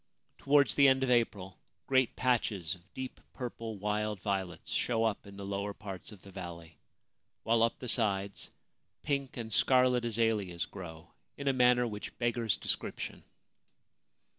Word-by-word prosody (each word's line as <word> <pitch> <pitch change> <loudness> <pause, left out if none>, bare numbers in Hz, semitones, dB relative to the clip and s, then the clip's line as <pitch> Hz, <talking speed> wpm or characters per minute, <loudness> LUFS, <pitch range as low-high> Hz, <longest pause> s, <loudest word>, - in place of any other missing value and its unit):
Towards 140 0 +4
the 140 -1 +6
end 135 0 +4
of 130 - +1
April 100 -6 +1 0.3
great 130 -2 +3
patches 110 -9 +1
of 90 +1 -15
deep 130 0 -6
purple 115 -4 -5
wild 105 0 -1
violets 95 -2 -3
show 115 -2 +1
up 110 -2 -1
in 100 0 -11
the 100 - -6
lower 100 +1 -3
parts 100 -2 -8
of 100 -3 -14
the 100 - -12
valley, 85 -4 -8 0.6
while 115 0 +3
up 115 0 +2
the 125 - -7
sides 100 -4 +1 0.5
pink 140 -3 -1
and 110 -2 -4
scarlet 125 0 +4
azaleas 110 -6 0
grow 85 -4 -10 0.3
in 140 - -4
a 135 - +4
manner 125 -1 +5
which 105 -3 -6
beggars 120 -5 +1
description. - - -4
110 Hz, 150 wpm, -32 LUFS, 100-125 Hz, 0.6 s, the